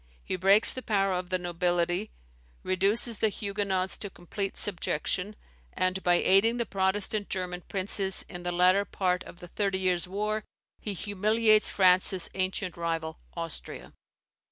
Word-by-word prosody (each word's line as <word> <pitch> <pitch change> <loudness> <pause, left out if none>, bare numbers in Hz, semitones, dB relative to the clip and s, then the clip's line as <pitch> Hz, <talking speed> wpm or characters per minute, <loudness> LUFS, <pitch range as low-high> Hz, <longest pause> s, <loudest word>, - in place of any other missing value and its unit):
He - - -3
breaks 195 +4 +4
the 255 - -5
power 195 -4 +1
of 180 0 -3
the 185 - +1
nobility, 175 +2 0 0.5
reduces 200 +5 +1
the 220 - +3
Huguenots 200 -2 -2
to 205 - -5
complete 195 +2 -5
subjection; 195 +1 0 0.4
and 185 +1 0
by 175 -1 +3
aiding 200 +7 +4
the 235 - 0
Protestant 200 +1 +1
German 180 -2 -3
princes 195 0 0
in 175 - -7
the 175 0 -3
latter 180 +3 +4
part 180 -2 -1
of 175 - -13
the 175 - -9
Thirty 195 -1 0
Years' 185 -2 +1
War, 210 +3 -2 0.4
he 210 - -4
humiliates 215 +3 +2
France's 185 -1 +3
ancient 185 -1 -1
rival, 165 -1 -3 0.2
Austria. 165 -2 -6
190 Hz, 145 wpm, -28 LUFS, 180-205 Hz, 0.5 s, breaks